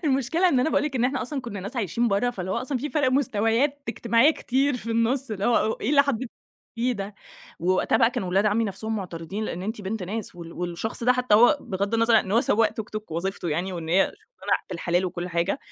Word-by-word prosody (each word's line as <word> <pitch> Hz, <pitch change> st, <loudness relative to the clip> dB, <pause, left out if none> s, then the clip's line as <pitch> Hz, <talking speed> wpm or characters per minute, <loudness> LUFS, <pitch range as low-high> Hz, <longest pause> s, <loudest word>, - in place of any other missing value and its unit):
المشكلة 285 Hz, +6 st, +2 dB
إن 260 Hz, -6 st, +3 dB
أنا 315 Hz, -, +1 dB
باقول -, -, +2 dB
لك 275 Hz, -3 st, -2 dB
إن 240 Hz, -, +1 dB
إحنا 265 Hz, +1 st, 0 dB
أصلًا 275 Hz, +1 st, -3 dB
كنّا 205 Hz, -6 st, -6 dB
ناس 205 Hz, +7 st, -7 dB
عايشين 230 Hz, +3 st, 0 dB
برّه، 210 Hz, +5 st, +1 dB
فاللي 185 Hz, -5 st, -5 dB
هو 190 Hz, -, 0 dB
أصلًا 255 Hz, +2 st, -2 dB
في 295 Hz, +4 st, -4 dB
فرق 290 Hz, -4 st, +2 dB
مستويات 255 Hz, +2 st, +1 dB
اجتماعيّة 235 Hz, +4 st, +3 dB
كتير 270 Hz, -2 st, 0 dB
في 230 Hz, -1 st, -6 dB
النُص 230 Hz, +3 st, +1 dB
اللي 205 Hz, -1 st, -3 dB
هو: 220 Hz, -2 st, +3 dB
"إيه 245 Hz, -, -1 dB
اللي 280 Hz, -1 st, +6 dB
حضرتِك 260 Hz, -3 st, -2 dB, 0.5 s
بتقوليه 245 Hz, +2 st, +1 dB
ده؟" 200 Hz, -1 st, -6 dB, 0.4 s
ووقتها 185 Hz, +5 st, +2 dB
بقى 230 Hz, -, +4 dB
كان -, -, -3 dB
ولاد 190 Hz, +4 st, +2 dB
عمي 220 Hz, +2 st, +2 dB
نفسهم 220 Hz, +2 st, -3 dB
معترضين، 180 Hz, +2 st, -5 dB
لأن 180 Hz, -3 st, -4 dB
أنتِ 215 Hz, +2 st, -4 dB
بنت 205 Hz, +1 st, -4 dB
ناس 210 Hz, +2 st, -4 dB
وال 170 Hz, -1 st, -9 dB
والشخص 180 Hz, +7 st, -4 dB
ده 250 Hz, -, +6 dB
حتّى 250 Hz, -4 st, +2 dB
هو 245 Hz, +7 st, +6 dB
بغض 200 Hz, +3 st, -2 dB
النظر 230 Hz, -1 st, +4 dB
إن 190 Hz, -, -5 dB
هو 230 Hz, -, +5 dB
سواق 225 Hz, -2 st, +3 dB
توك 220 Hz, -, -6 dB
توك، 215 Hz, -4 st, -6 dB
وظيفته 175 Hz, +1 st, -3 dB
يعني 175 Hz, +5 st, -1 dB
وإن 165 Hz, -2 st, -6 dB
هي 175 Hz, -, +2 dB
شغلانة 430 Hz, +4 st, -3 dB
بالحلال 175 Hz, +1 st, 0 dB
وكل 180 Hz, 0 st, -4 dB
حاجة، 170 Hz, +8 st, 0 dB
225 Hz, 230 wpm, -25 LUFS, 190-250 Hz, 0.5 s, اللي